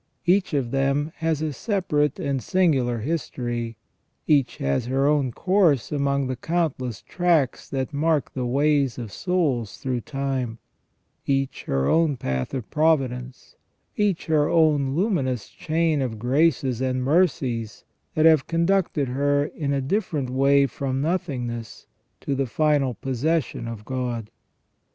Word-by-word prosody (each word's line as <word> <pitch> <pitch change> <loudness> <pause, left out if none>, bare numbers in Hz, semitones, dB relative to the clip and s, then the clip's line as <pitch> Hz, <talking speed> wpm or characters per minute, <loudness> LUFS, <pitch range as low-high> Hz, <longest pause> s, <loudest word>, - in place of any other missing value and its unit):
Each 180 -2 +2
of 125 -4 -1
them 140 +3 +1
has 160 -2 -1
a 155 -2 -2
separate 150 - 0
and 135 -2 -1
singular 130 -11 +1
history; 120 -5 -3 0.5
each 145 -5 +2
has 70 - -1
her 135 +2 +1
own 145 -3 +2
course 175 - +2
among 140 -1 0
the 130 0 -2
countless 130 - -2
tracks 170 -8 +1
that 135 +1 -3
mark 150 -1 0
the 125 -2 -2
ways 140 0 +2
of 115 -5 -6
souls 145 - -1
through 125 -2 -2
time; 135 -4 -3 0.7
each 135 -1 -1
her 70 0 0
own 160 -4 +2
path 65 - -3
of 125 -5 -4
providence; 135 -5 0 0.4
each 205 -7 0
her 150 -2 +2
own 150 -5 +3
luminous 145 - 0
chain 160 -2 0
of 120 -4 -2
graces 130 0 +1
and 130 -1 0
mercies 130 - 0 0.3
that 155 - +3
have 155 -4 +5
conducted 170 -4 +1
her 145 +2 +1
in 145 -1 -3
a 140 -1 0
different 150 - -1
way 140 +1 +4
from 135 0 -3
nothingness 135 - -3 0.4
to 140 - -2
the 135 -1 0
final 145 -2 +1
possession 135 0 -1
of 110 -2 -7
God. 120 -4 -3
140 Hz, 135 wpm, -24 LUFS, 125-160 Hz, 0.7 s, have